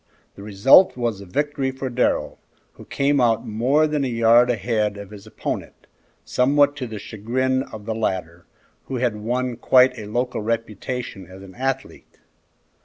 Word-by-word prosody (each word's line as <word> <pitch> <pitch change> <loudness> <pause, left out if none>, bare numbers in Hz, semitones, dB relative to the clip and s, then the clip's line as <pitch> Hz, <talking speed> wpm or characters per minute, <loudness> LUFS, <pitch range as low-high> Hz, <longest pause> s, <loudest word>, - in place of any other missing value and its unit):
The - - -13
result 105 - +5
was 115 -5 -2
a 100 - -11
victory 145 +6 -1
for 130 0 -5
Darrell, 125 0 -1 0.3
who - - -14
came 140 0 +1
out 115 0 +2
more 125 +8 +2
than 150 -2 -1
a - - 0
yard 115 +1 +4
ahead 110 -2 -1
of 100 0 -10
his 105 0 -12
opponent, - - -6 0.4
somewhat 145 +3 +2
to 130 -3 -4
the 110 -1 -7
chagrin 125 +6 -2
of 110 -6 -9
the 110 - -2
latter, 90 -6 -3 0.4
who 135 - -5
had 120 -3 0
won 120 +3 -2
quite 125 +1 +4
a 105 - -7
local 120 +2 -2
reputation 115 -2 -4
as 95 +2 -12
an 95 -1 -13
athlete. 135 +3 -5
120 Hz, 165 wpm, -22 LUFS, 105-130 Hz, 0.4 s, result